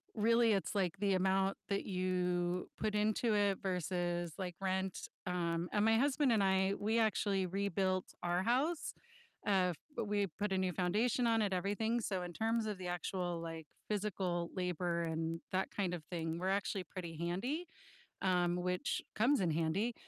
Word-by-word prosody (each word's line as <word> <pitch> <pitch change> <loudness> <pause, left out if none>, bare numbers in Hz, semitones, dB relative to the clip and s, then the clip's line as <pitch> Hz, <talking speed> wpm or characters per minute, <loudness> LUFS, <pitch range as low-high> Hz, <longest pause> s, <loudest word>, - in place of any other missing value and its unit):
really 230 +1 +4
it's 195 - 0
like 185 -4 +1
the 200 -1 +2
amount 190 +1 +2
that 200 -1 0
you 180 -1 0
put 215 -1 0
into 215 +2 +2
it 200 -2 +2
versus, 175 -2 -1
like, 180 -2 -4
rent, 190 0 -1 0.2
um, 170 -1 -1
and 210 0 +2
my 225 0 +5
husband 275 +1 +3
and 210 -3 +4
I, 190 0 +3
we 220 +3 +1
actually 200 -3 +2
rebuilt 190 0 0 0.2
our 175 +1 +1
house, 275 +8 +1 0.5
uh, 185 -3 +4
f 165 - -8 0.3
we 205 -1 +1
put 200 +4 -3
a 190 - +2
new 185 -2 +1
foundation 215 +7 +2
on 225 -1 +3
it, 200 -3 +1
everything, 215 +5 0
so 190 -4 -1
in 175 - -6
terms 225 +3 +1
of 210 -2 -2
the 185 -1 -5
actual, 175 0 -2
like, 165 -2 -6 0.2
physical 190 -5 -1
labor 175 -2 -1
and 165 0 -2
that 190 +1 0
kind 185 -3 -1
of 170 - -4
thing, 165 -2 -3
we're 185 +1 0
actually 195 0 0
pretty 170 -1 -7
handy, 200 - -2 0.6
um, 180 -2 +2
which 180 0 -1
comes 245 +3 +4
in 175 - +2
handy, 165 +9 0
190 Hz, 170 wpm, -36 LUFS, 175-210 Hz, 0.6 s, my